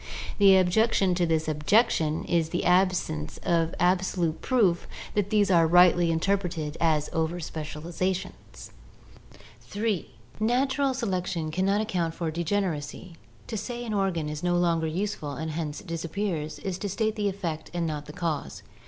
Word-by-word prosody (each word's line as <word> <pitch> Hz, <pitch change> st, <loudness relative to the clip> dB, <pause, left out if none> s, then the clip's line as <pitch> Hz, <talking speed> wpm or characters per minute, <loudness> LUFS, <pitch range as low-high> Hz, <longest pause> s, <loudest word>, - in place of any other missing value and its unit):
The 195 Hz, -1 st, +7 dB
objection 190 Hz, +1 st, +3 dB
to 175 Hz, -1 st, +1 dB
this 160 Hz, -1 st, 0 dB
objection 155 Hz, 0 st, +2 dB
is 165 Hz, -2 st, +1 dB
the 175 Hz, -, -2 dB
absence 180 Hz, -, +1 dB
of 165 Hz, -1 st, +1 dB
ab 180 Hz, +1 st, +3 dB
solute 175 Hz, -4 st, -2 dB
proof 205 Hz, -10 st, +2 dB, 0.3 s
that 205 Hz, -1 st, 0 dB
these 205 Hz, -2 st, +3 dB
are 165 Hz, -2 st, +5 dB
rightly 175 Hz, 0 st, +5 dB
interpreted 165 Hz, -3 st, -1 dB
as 155 Hz, -3 st, +2 dB
over 160 Hz, +2 st, 0 dB
specializa 160 Hz, +4 st, -3 dB
tions. 180 Hz, -, -10 dB, 0.9 s
(3) 205 Hz, -4 st, -2 dB, 0.3 s
Natural 265 Hz, +4 st, +1 dB
selection 180 Hz, -8 st, -2 dB
can 185 Hz, +4 st, 0 dB
not 200 Hz, +2 st, +2 dB
account 175 Hz, -6 st, -1 dB
for 165 Hz, -2 st, -2 dB
degeneracy. 170 Hz, -1 st, -2 dB, 0.3 s
To -, -, -5 dB
say 240 Hz, +3 st, -4 dB
an 220 Hz, -, -3 dB
organ 190 Hz, -6 st, 0 dB
is 150 Hz, 0 st, -5 dB
no 175 Hz, 0 st, +1 dB
longer 165 Hz, -2 st, +1 dB
useful 165 Hz, -3 st, -3 dB
and 160 Hz, +4 st, -4 dB
hence 155 Hz, -2 st, -4 dB
disappears, 165 Hz, -2 st, -3 dB
is 190 Hz, -2 st, -4 dB
to 205 Hz, -, -3 dB
state 220 Hz, +3 st, 0 dB
the 205 Hz, -2 st, 0 dB
effect 170 Hz, -5 st, -4 dB
and 175 Hz, -1 st, -2 dB
not 150 Hz, -2 st, -4 dB
the 150 Hz, -, -9 dB
cause. 165 Hz, -4 st, -3 dB
175 Hz, 155 wpm, -27 LUFS, 160-200 Hz, 0.9 s, The